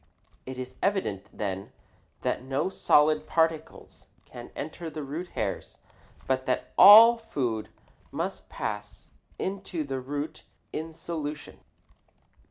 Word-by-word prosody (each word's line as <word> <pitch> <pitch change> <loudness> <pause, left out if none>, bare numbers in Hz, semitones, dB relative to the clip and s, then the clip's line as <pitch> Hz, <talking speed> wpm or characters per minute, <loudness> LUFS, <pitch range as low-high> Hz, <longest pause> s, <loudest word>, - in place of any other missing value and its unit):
It 130 0 -6
is 130 0 -7
evident, 185 - -1
then, 95 -2 -4 0.5
that - - -1
no 135 +7 -1
solid 155 -4 +3
particles 160 -1 -1 0.2
can - - -10
enter 160 +3 -6
the 155 -1 -6
root 155 +6 -5
hairs, 100 -3 -3 0.5
but 130 0 -1
that 130 - -1
all 225 +4 +10
food 125 - -3 0.4
must - - -4
pass 105 -1 -6 0.2
into 190 -4 -3
the 135 -2 -4
root 145 +4 -5 0.3
in 160 +1 -4
solution. 155 -2 -6
150 Hz, 115 wpm, -27 LUFS, 130-165 Hz, 0.5 s, all